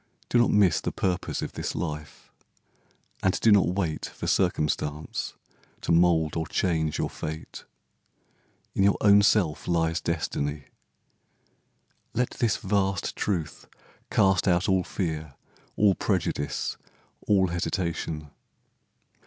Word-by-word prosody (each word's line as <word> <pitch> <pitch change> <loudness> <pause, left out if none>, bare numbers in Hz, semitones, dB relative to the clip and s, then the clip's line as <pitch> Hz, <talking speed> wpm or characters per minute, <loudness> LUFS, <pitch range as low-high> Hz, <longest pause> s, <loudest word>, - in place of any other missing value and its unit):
Do 120 - +3
not 120 - +4
miss 100 -6 +4
The - - -2
purpose 90 -2 -2
of - - -4
this - - -4
life, 75 -3 -6 0.9
and 95 - +1
do 115 - +4
not 100 -2 +5
wait 90 -4 -2
For - - -8
circumstance 75 0 -1 0.5
to - - -1
mould 85 -2 +3
or 80 0 -2
change 80 -4 0
your - - 0
fate; 80 +1 -7 1.1
In - - 0
your 100 0 +4
own 100 0 +7
self 100 -7 +2
lies 80 -1 +1
Destiny. 75 -3 -2 1.5
Let 125 +1 +1
this 115 -4 0
Vast 95 -1 -1
truth 85 -7 -3 0.4
cast 95 -1 +3
out 90 0 +3
all 95 -2 +3
fear, 80 -7 -4 0.4
all 105 -2 +4
prejudice, 70 -4 -1 0.5
All 95 -3 +4
hesitation. 85 -3 -3
85 Hz, 120 wpm, -26 LUFS, 80-95 Hz, 1.5 s, own